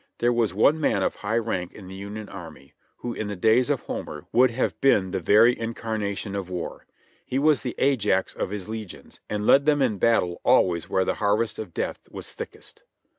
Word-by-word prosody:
There 120 +1 +2
was 115 -4 +1
one 140 - +3
man 100 -9 +2
of - - -1
high 110 +3 -1
rank 100 -6 -2
in 95 -3 -11
the 95 - -9
Union 100 +2 -7
Army, 80 -7 -11 0.2
who 120 - -5
in 110 - -4
the 105 - -4
days 110 +7 +3
of 145 -3 0
Homer 75 -1 -6
would 125 +2 +5
have 120 +2 -2
been 100 -9 +3
the 95 - -1
very 110 +7 +5
incarnation 110 -3 -4
of 95 -2 -4
War. 90 -2 -6 0.4
He 130 - -3
was 150 0 +3
the 125 - -4
Ajax 105 -8 +1
of - - -3
his 105 -1 -6
legions, 110 -3 -8
and 105 0 -2
led 140 +5 +5
them 150 -1 +4
in 115 -8 +1
battle 90 -6 +2
always 85 -3 +3
where 95 - +1
the - - +1
harvest 105 +2 +1
of 100 -6 -7
death - - -2
was - - -9
thickest. - - -10
105 Hz, 205 wpm, -25 LUFS, 95-120 Hz, 0.4 s, would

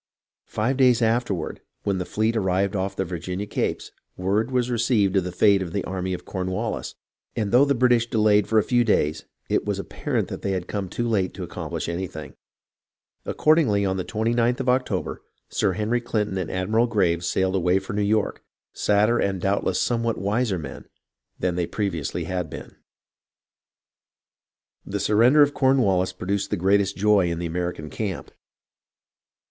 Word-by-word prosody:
Five 120 +5 -1
days 125 -3 +4
afterward, 110 -6 -1 0.2
when 100 -2 0
the 90 - -4
fleet 110 +2 0
arrived 95 -1 +1
off 95 0 -2
the 95 - -1
Virginia 90 +3 -4
capes, 105 - -3 0.3
word 100 +6 0
was 125 -1 0
received 115 -5 +2
of 95 - +3
the 90 - -4
fate 100 +2 +4
of 85 -3 -5
the 100 - -1
army 95 0 -3
of 90 - -11
Cornwallis, 95 0 -3 0.4
and 105 -3 -1
though 125 +4 +6
the 140 -1 +1
British 120 -1 +3
delayed 105 -2 +3
for 110 - +2
a 110 - +5
few 120 -1 +2
days, 80 -9 +1 0.2
it - - +1
was - - -2
ap - - -7
parent - - -2
that - - -6
they 100 - -1
had 90 -2 -3
come 100 -3 -3
too 120 +5 -2
late 100 -5 0
to - - -5
accomplish - - -5
anything; 85 -2 -5 0.9
accordingly, 140 -11 +3
on 95 0 0
the 95 - -2
29th 115 +4 0
of 130 -1 0
October, 130 +1 -1 0.3
Sir - - +1
Henry 110 +3 0
Clinton 105 -4 -1
and 90 - -3
Admiral 110 +6 +1
Graves 85 -6 +1
sailed 95 +1 +1
away 90 -1 +2
for 95 0 -5
New 105 - 0
York, 105 +1 0 0.3
sadder 105 +3 +2
and 95 -1 0
doubtless 100 +3 0
somewhat 115 -1 0
wiser 105 0 0
men 80 - -8 0.5
than 90 -1 0
they 85 -1 -1
previously 95 -8 -2
had 90 -3 -3
been. - - -9 2.1
The 100 +1 -4
surrender 115 +9 +5
of 145 0 +1
Cornwallis 105 -10 +2
produced 95 +2 -2
the 105 - -1
greatest 100 +2 +2
joy 100 -3 +3
in 85 - -2
the 85 - -3
American 85 -2 -4
camp. 100 -5 -4
100 Hz, 170 wpm, -24 LUFS, 95-115 Hz, 2.1 s, though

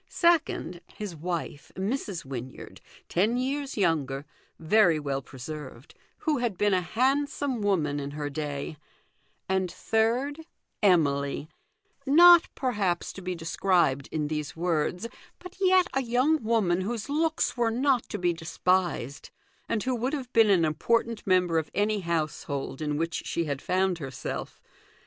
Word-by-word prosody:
Second, 320 - +1
his 205 -5 -6
wife, 165 -2 -5
Mrs. 195 - -3
Wynyard, 130 -1 -8 0.3
ten 210 +7 +1
years 275 +1 -2
younger, 145 -7 0 0.3
very 170 -1 +4
well 140 -2 -2
preserved, 135 0 -9 0.2
who 315 - 0
had 235 -6 -1
been 205 0 +2
a 185 - +3
handsome 265 - 0
woman 160 -8 +1
in 140 0 -4
her 145 -1 -2
day; 145 +1 -4 0.7
and 190 -1 0
third, 245 +7 0 0.4
Emily, 145 -6 +2 0.6
not, 345 +4 +8
perhaps, 205 -9 -1
to 195 - -9
be 180 0 -3
described 165 -4 +1
in 155 -2 -1
these 150 -1 -4
words, 175 +4 -1 0.3
but 365 +1 -12
yet 370 -1 +5
a 270 - +1
young 255 +5 +2
woman 210 -6 +2
whose 215 +2 -3
looks 315 +2 0
were 240 -2 +1
not 255 +2 +2
to 210 - -3
be 175 -2 +1
despised, 165 -4 -1 0.4
and 215 - 0
who 255 - 0
would 250 +4 -1
have 260 -4 -4
been 225 -2 +5
an 180 -5 +4
important 230 +8 0
member 180 -3 +3
of 155 - -5
any 210 +1 +1
house 165 -4 -2
hold 140 -1 -4
in 150 -1 -1
which 165 +1 -2
she 170 - -1
had 140 -2 -3
found 185 -1 0
herself. 135 -4 -6
185 Hz, 145 wpm, -27 LUFS, 155-240 Hz, 0.7 s, not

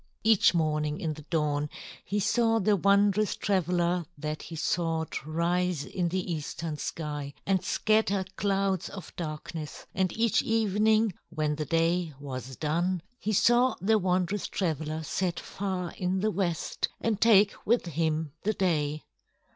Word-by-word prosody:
Each 220 -4 +5
morning 150 -2 0
in 160 -2 -2
the 150 - -10
dawn 150 -3 0 0.3
he 205 - -1
saw 225 +2 +2
the 210 -1 +3
wondrous 200 +2 +3
traveler 180 -2 +1
that 150 +1 -4
he 165 - -8
sought 160 -1 -1
rise 170 0 0
in 180 -2 -1
the 180 0 -2
eastern 160 +1 -4
sky 150 -3 -4
and 190 -2 +1
scatter 215 -1 +2
clouds 195 -2 0
of 190 - -9
darkness; 155 -1 -6
and 185 -1 +1
each 230 -2 +3
evening, 220 -1 +2 0.2
when 155 -2 -1
the 150 0 -3
day 165 -1 +1
was 130 -2 -6
done, 170 +4 0 0.2
he 215 - -2
saw 240 +5 +4
the 215 +3 +3
wondrous 185 +1 0
traveler 160 -3 -2
set 175 +3 -1
far 190 -3 -4
in 185 +1 -1
the 215 +1 +1
west 175 -3 -1
and 215 -3 -1
take 210 -3 +6
with 235 -1 +2
him 160 -2 -1
the 215 - 0
day. 155 -6 0
180 Hz, 145 wpm, -28 LUFS, 155-200 Hz, 0.3 s, take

